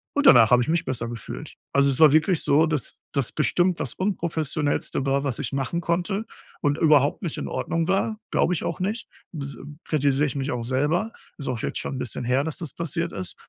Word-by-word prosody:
und 290 0 +1
danach 120 - +8
habe 125 0 +6
ich 140 - -5
mich 165 0 +1
besser 120 -3 -2
gefühlt. 115 -2 -7 0.2
Also, 140 0 +4
es 130 - -2
war 155 -3 +8
wirklich 160 +2 +3
so, 150 +3 +4
dass 150 -5 -3 0.2
das 140 -5 0
bestimmt 175 +3 +1
das 125 - -3
Unprofessionellste 160 -7 -1
war, 140 +1 +1
was 135 -5 -1
ich - - -2
machen 140 +6 -1
konnte 180 +5 -1 0.4
und 145 +1 +1
überhaupt 150 -3 +4
nicht 170 -6 -3
in - - -4
Ordnung 165 0 -2
war, 195 +3 0
glaube 180 - +2
ich - - -3
auch 170 0 -3
nicht. 210 +5 -2 0.3
Bs 140 -3 -5
m 150 +1 -11
kritisiere 145 -1 +2
ich 145 - -3
mich 140 +1 -2
auch 120 -1 -3
selber, 150 - 0 0.3
ist 140 - -7
auch 125 -3 -2
jetzt - - -3
schon - - -4
‘n 130 - -4
bisschen 125 0 -4
her, 130 +3 +2
dass 160 -1 -4
das 155 -5 -6
passiert 170 +1 -3
ist. 95 -2 -5
150 Hz, 220 wpm, -24 LUFS, 135-170 Hz, 0.4 s, danach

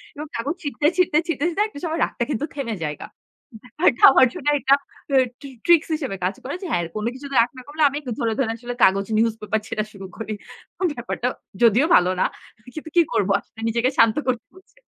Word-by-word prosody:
এবং 300 +1 -6
কাগজ 280 +8 -2
ছিঁড়তে, 290 0 -3
ছিঁড়তে, 360 -4 +3
ছিঁড়তে 335 +4 0
একটা 405 -9 -10
সময় 330 -1 -2
রাগটা - - -1
কিন্তু 285 0 -1
থেমে 245 -6 -3
জায়গা। 150 -1 -4 0.6
ব্যাপারটা 250 +1 0
আমার 260 - +6
জন্য 335 -6 -8
একটা 270 0 +4 0.7
ট্রি 280 -1 -9 0.2
ট্রিক্স 340 -2 +5
হিসেবে 275 -10 -3
কাজ 185 +3 0
করে 270 - -4
যে, - - -4
হ্যাঁ, 175 - +1
কোনো 215 +2 -1
কিছুতে 275 +1 -8
রাগ 230 - +2
না - - -8
করলে 305 +2 -3
আমি 280 +1 -4 0.2
ধরে, 230 -4 0
ধরে 260 -5 +1
আসলে 245 +1 -6
কাগজ 195 +1 +4
নিউজ 225 0 +2
পেপার 210 +1 -1
ছেঁড়া 215 -2 -2
শুরু 195 -1 -9
করি। 220 -1 -5 0.6
ব্যাপারটা 240 0 -3 0.3
যদিও 235 +5 +5
ভালো 180 +1 +5
না। - - +4 0.5
কিন্তু 315 0 -7
কি - - +8
করব 195 - +1
আসলে 225 - -16
নিজেকে 235 +3 +1
শান্ত 230 -1 +5
করতে 250 -3 -1
বলছে 375 +6 -20
255 Hz, 195 wpm, -22 LUFS, 225-295 Hz, 0.7 s, কি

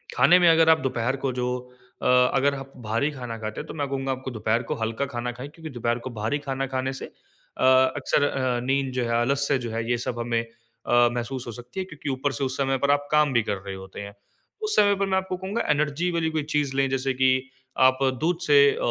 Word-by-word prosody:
खाने 175 +6 +6
में 175 - +5
अगर 165 0 +5
आप 160 0 +6
दोपहर 125 -1 -1
को - - 0
जो 125 0 0 0.5
अ, - - -3 0.3
अगर 140 +1 +2
आप 135 0 -8
भारी 115 +8 0
खाना 125 -4 -6
खाते 110 0 -5
हैं, 155 - -11
तो - - -7
मैं 145 -3 -2
कहूँगा 135 -1 -2
आपको 130 0 -4
दोपहर 110 +1 0
को - - +1
हल्का 115 +4 -2
खाना 120 +1 -2
खाएँ 130 +4 -8
क्योंकि 160 0 -10
दोपहर 120 -1 -1
को - - -3
भारी 110 +7 0
खाना 135 -1 -3
खाने 130 0 -2
से 135 - -6
अ, - - -11 0.3
अक्सर 145 +1 +1
अ, 130 -3 0
नींद 135 +1 0
जो 125 -1 -1
है, 115 - -3
आलस्य 140 +2 +1
जो 115 - -4
है 115 +1 -3
ये 120 - +2
सब 120 - -3
हमें 115 -1 0
अ, 115 +1 0
महसूस 125 +1 -4
हो - - -4
सकती 125 - -8
है, 185 - -2
क्योंकि 150 -4 -7
ऊपर 135 +2 -1
से - - -2
उस 130 0 -1
समय 135 -1 +1
पर 140 +2 +2
आप 145 0 +1
काम 150 -3 +3
भी 120 - +3
कर 105 -2 -2
रहे 95 0 -7
होते 95 +1 -9
हैं। 100 0 -9 0.5
उस 425 0 +2
समय 205 -1 +5
पे 200 - 0
मैं 190 -1 +1
आपको 190 -1 -2
कहूँगा 195 +5 -3
एनर्जी 150 +4 0
वाली 165 -1 0
कोई 155 -1 -1
चीज़ 145 -2 0
लें 135 0 +2
जैसे 135 0 0
कि 130 0 +3 0.6
आप 130 0 +1 0.2
दूध 170 +1 +1
से 145 -1 +6
अ, - - -5
135 Hz, 245 wpm, -25 LUFS, 120-145 Hz, 0.6 s, खाने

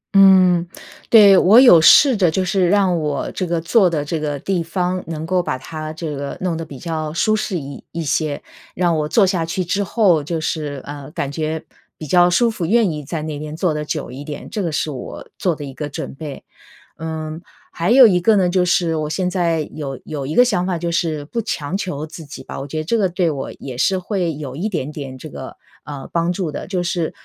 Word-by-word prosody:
嗯， 185 -3 +6 0.4
对， 205 -4 +8
我 215 +6 +7
有 180 -11 +8
试 265 - +7
着 185 -5 +3
就 185 +3 0
是 185 -1 +1
让 190 -3 +2
我 150 -2 -2
这 185 - -3
个 170 -1 0
坐 185 +3 +3
的 150 -3 -2
这 160 +2 -2
个 145 -2 -2
地 180 +4 -1
方 180 +2 -2
能 160 -1 -5
够 180 +1 +1
把 130 - -3
它 155 +3 -7
这 155 -2 -5
个 140 0 -5
弄 180 -3 -1
得 165 - -4
比 145 -4 -10
较 155 0 -4
舒 215 +6 +2
适 215 -3 -2
一 140 -1 -9
一 165 0 -4
些， 150 0 -1 0.3
让 175 -2 +1
我 150 -1 -1
坐 205 +3 +4
下 180 -3 0
去 185 +2 -2
之 200 +4 0
后 185 -6 +2
就 165 +2 -3
是， 150 -4 -3
呃， 145 -1 -8
感 140 -3 -3
觉 155 +1 -3 0.3
比 155 - -7
较 175 +4 +4
舒 235 +6 +3
服， 210 -5 -5
愿 220 -3 +3
意 150 -1 -5
在 155 +2 -4
那 155 -2 -5
边 150 +1 -6
坐 170 -2 +1
得 150 - -3
久 150 -4 -4
一 135 +3 -8
点， 145 -1 -7
这 210 - -2
个 170 - -2
是 150 0 -1
我 130 - -8
做 175 -4 +1
的 145 - -7
一 135 - -8
个 150 +1 -5
准 145 - -6
备。 145 0 -8 0.6
嗯， 160 0 -5 0.3
还 170 +3 -2
有 255 +1 +8
一 185 -5 +4
个 215 +4 +4
呢， 185 -2 +3
就 180 0 +2
是 175 -2 +1
我 155 -1 -2
现 185 +3 -1
在 170 -4 0
有 135 -4 -5
有 145 -3 -5
一 155 - -4
个 245 - +6
想 200 -8 0
法 180 - -1
就 170 0 -3
是 160 -3 -1
不 230 +10 -3
强 150 -5 -3
求 155 -6 -3
自 160 +1 -10
己 145 - -10
吧， - - -7
我 140 - -6
觉 155 - -6
得 155 - -1
这 175 +9 0
个 190 -3 +2
对 175 -2 0
我 135 -2 -5
也 130 -2 -8
是 190 - +2
会 180 -4 -2
有 140 -3 -7
一 195 +8 -2
点 155 -7 -3
点 135 -3 -7
这 155 - -9
个， 130 -3 -9 0.3
呃， 145 -2 -7
帮 170 +1 +1
助 180 -3 -3
的。 - - -6
就 185 -2 -2
是 170 -2 -1
165 Hz, 255 characters per minute, -19 LUFS, 150-185 Hz, 0.6 s, 对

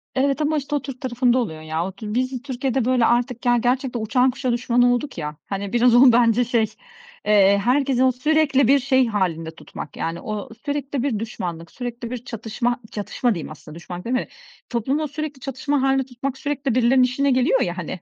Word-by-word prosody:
Evet 275 +2 +1
ama 305 +1 +1
işte 290 +1 -2
o 290 - 0
Türk 270 -2 -8
tarafında 250 -1 +1
oluyor 160 -11 -2
ya. 160 +2 -2
O 190 - -4
tür 210 +2 -7
biz 255 +1 -1
Türkiye'de 260 -2 -1
böyle 255 -2 +3
artık, 245 +1 0
ya, 240 0 +4
gerçekten 250 +1 0
uçan 250 +4 +2
kuşa 255 0 -2
düşman 240 0 +1
olduk 245 +2 +1
ya, 150 -2 -4
hani, 200 0 -4
biraz 240 0 +4
o 250 +1 +8
bence 235 0 +4
şey, 235 -2 +2 0.6
eee, 200 -1 +5
herkesi 260 +1 +2
o 260 - +5
sürekli 280 0 +2
bir 280 +2 +5
şey 260 -1 +2
hâlinde 175 -7 -1
tutmak. 150 - -9
Yani 165 +1 -3
o 210 -1 -5 0.2
sürekli 285 -2 -2
bir 245 -7 0
düşmanlık, 175 -7 -5
sürekli 240 -2 -6
bir 250 -1 -6
çatışma, 235 +1 -2
çatışma 220 +3 -1
diyeyim 160 - -6
aslında, 155 0 -12
düşmanlık 175 +2 -8
deme 255 +2 -1 0.4
Toplumu 270 +6 -1
sürekli 290 -1 -5
çatışma 275 +2 -2
hâlinde 270 0 +2
tutmak 265 +1 -5
sürekli 280 -3 -2
birilerinin 255 +1 +4
işine 270 +3 +1
geliyor 255 0 +3
ya 175 -5 -1
hani 180 +1 -5
245 Hz, 195 wpm, -22 LUFS, 220-270 Hz, 0.6 s, o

